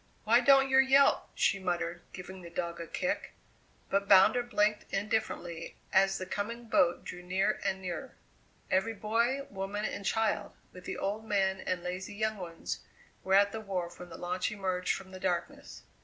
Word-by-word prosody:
"Why 230 +3 +5
don't 270 +2 +6
yer 265 - +6
yelp?" 270 +1 +5
she 195 - +2
muttered, 175 -2 -2
giving 185 +1 -9
the 170 - -9
dog 170 0 -4
a 165 - -6
kick. 275 - -2 0.6
But 200 0 +1
Bounder 200 +5 +7
blinked 210 -3 0
indifferently 195 -5 -2 0.2
as 195 0 +4
the 185 - -4
coming 230 +5 -4
boat 180 -6 +2
drew 180 - -7
near 185 +2 0
and 190 -1 -1
nearer. 175 -3 -5 0.6
Every 220 +4 +1
boy, 230 +6 0
woman, 200 +2 -3
and 205 - -4
child, 220 +2 0 0.2
with 180 0 -12
the - - -4
old 205 +3 -2
men 195 -3 +1
and 180 -2 -2
lazy 185 +3 -5
young 215 0 -1
ones, 165 - -5 0.4
were 190 0 +3
at 200 +1 +5
the 220 - -5
wharf 185 -4 -4
when 180 - -9
the - - -9
launch 180 +3 -2
emerged 185 -3 -1
from 190 -1 -9
the 185 - -9
darkness. 180 -2 -3
195 Hz, 175 wpm, -31 LUFS, 180-215 Hz, 0.6 s, Bounder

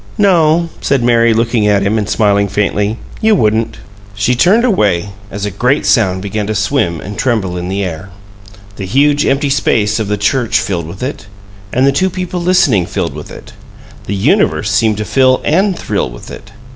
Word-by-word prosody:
"No," 170 -5 +3
said 135 -3 0
Mary, 115 -1 +3
looking 115 -1 +1
at 100 -1 +2
him 105 +3 +1
and 105 -1 -3
smiling 100 -2 +2
faintly, 105 +2 -1 0.2
"you 220 -1 +4
wouldn't." 110 - 0 0.4
She 105 +5 +1
turned 190 - +3
away 105 - +1 0.2
as 100 0 -5
a 105 - -3
great 125 +9 0
sound 95 -6 +2
began 100 +1 -3
to 110 - -2
swim 100 - 0
and 105 +5 -8
tremble 110 -8 -1
in 90 0 -4
the 100 +1 -2
air; 90 +1 -6 0.7
the 95 - -5
huge 145 +7 +2
empty 135 +1 +1
space 110 -5 +1
of 110 - -2
the 105 0 -1
church 110 +4 +1
filled 85 -5 -3
with 95 +8 -8
it, 130 -5 -5 0.4
and 130 +2 +2
the 140 - +4
two 185 +7 +1
people 180 -1 -4
listening 170 - +2
filled - - -3
with - - -9
it; - - -12 0.5
the 100 - -2
universe 95 -1 +1
seemed 105 +1 +1
to 105 - -3
fill 130 +1 +3
and 185 +4 +1
thrill 100 -10 -2
with - - -11
it. 100 - -11
110 Hz, 190 wpm, -14 LUFS, 100-140 Hz, 0.7 s, you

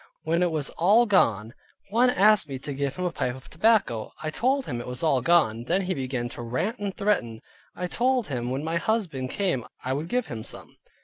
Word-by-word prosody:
When 165 +2 +1
it 180 - +3
was 155 -3 -2
all 210 +8 +5
gone, 115 - +2 0.4
one 240 +4 +4
asked 210 -7 +4
me 135 - -4
to 140 +2 -6
give 140 0 -2
him 180 - -3
a 175 - 0
pipe 125 -6 -2
of 130 - -14
tobacco. 165 - +2
I 155 - -2
told 260 - +1
him 120 - -4
it - - -9
was 125 +3 -5
all 140 -5 +3
gone. 120 -7 +3
Then 185 +6 +1
began 130 -8 -2
he 120 - -4
to 120 - -8
rant 130 - -2
and 200 -2 -4
threaten. 120 - 0 0.4
I 180 - -3
told 250 +5 +1
him 125 -6 -3
when 135 +3 -2
my 165 +1 -1
husband 170 - -1
came 180 - -1 0.2
I 130 - 0
would 150 +4 -3
give 250 +4 0
him 115 -4 -6
some. - - -7
160 Hz, 225 wpm, -26 LUFS, 130-205 Hz, 0.4 s, all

